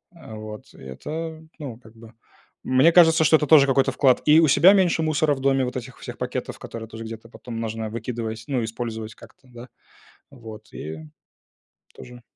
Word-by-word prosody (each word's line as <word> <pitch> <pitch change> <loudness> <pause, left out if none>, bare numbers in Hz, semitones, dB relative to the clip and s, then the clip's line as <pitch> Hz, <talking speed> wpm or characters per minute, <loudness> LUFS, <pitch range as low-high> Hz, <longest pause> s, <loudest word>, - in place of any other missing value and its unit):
Э, 140 -9 -12
вот. 110 0 -10
Это, 155 - -7 0.2
ну, 135 -7 -7
как 115 -2 -19
бы, 115 0 -15 0.5
мне 130 +6 +4
кажется, 165 -2 +5
что 160 - +5
это 150 - +2
тоже 145 -2 +6
какой-то 135 0 +2
вклад. 130 -3 +2
И 150 +1 +6
у 165 - +4
себя 175 +7 +6
меньше 180 -5 +2
мусора 155 -1 +1
в 135 - -9
доме, 135 -1 +2
вот 125 - -6
этих 125 +1 -9
всех - - -9
пакетов, - - -5
которые 115 -1 -8
тоже 115 0 -9
где-то 115 0 -9
потом 115 -1 -8
нужно 110 -1 -4
выкидывать, 115 -1 -5
ну, 130 -4 -1
использовать 110 -1 -5
как-то, 120 +3 -18
да. 120 0 -12 0.6
Вот 115 -5 -12
и 80 +1 -7 1.0
тоже. 120 0 -13
125 Hz, 180 wpm, -23 LUFS, 115-150 Hz, 1.0 s, тоже